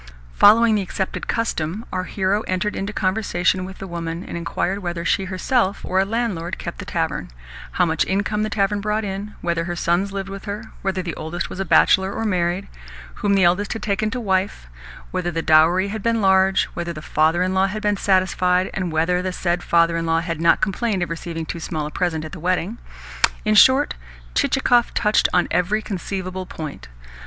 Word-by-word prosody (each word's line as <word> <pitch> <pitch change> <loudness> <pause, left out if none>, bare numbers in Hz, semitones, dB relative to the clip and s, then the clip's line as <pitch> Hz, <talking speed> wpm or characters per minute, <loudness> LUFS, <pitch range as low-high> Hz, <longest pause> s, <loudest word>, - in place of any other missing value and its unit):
Following 225 - +6
the 210 - +2
accepted 190 0 -4
custom, 215 -2 -2
our 185 0 -1
hero 195 +2 0
entered 185 +3 -1
into 195 +2 -3
conversation 185 -3 0
with 190 0 -9
the - - -7
woman, 170 -1 -5
and - - -7
inquired 175 +3 -2
whether 175 -3 -4
she 190 +3 +1
herself 195 +2 0
or 185 - +1
a 190 - +3
landlord 205 -6 -2
kept - - -7
the - - -6
tavern; - - -2 0.4
how 180 - +3
much 160 -1 +1
income 205 +2 0
the 215 - -1
tavern 205 0 0
brought 210 +1 -1
in; 200 +2 -5
whether 170 -1 -1
her 175 0 -3
sons 175 +3 0
lived 195 -1 -4
with 195 0 -8
her; 210 +2 -6
whether 190 -1 -1
the 170 -2 -4
oldest 160 +3 -5
was - - -7
a 195 - -1
bachelor 190 +2 +4
or 225 - -3
married; 180 -1 0 0.5
whom 200 -1 +2
the 195 - +4
eldest 180 +4 +2
had 225 - -7
taken 215 +1 0
to 240 +3 -3
wife; 190 - -1 0.5
whether 180 -1 -1
the 165 -1 -3
dowry 170 +5 +4
had 215 +1 -4
been 230 +1 +1
large; 190 -1 +4
whether 170 0 -4
the 155 -1 -9
father 160 +4 +2
in 185 +1 -1
law 190 +1 +3
had 215 +3 -5
been 210 0 +2
satisfied, 185 -1 +2
and 180 -3 -2
whether 165 +3 +1
the 185 0 -2
said 175 -1 -1
father 170 -1 +3
in 165 0 -2
law 165 0 +2
had 165 -1 -4
not 170 0 +4
complained 205 -2 0
of 170 - -5
receiving 165 -1 -5
too 170 - -5
small 155 -2 -3
a 150 - -6
present 160 -3 -1
at 155 - -8
the 185 - -8
wedding. 185 +6 -1 0.7
In 215 - +3
short, 260 +7 +6 0.4
Chichikov 260 -3 +2
touched 210 -1 +3
on 180 -1 +2
every 185 +5 +1
conceivable 185 -1 -4
point. 150 - -7
185 Hz, 200 wpm, -21 LUFS, 175-205 Hz, 0.7 s, Following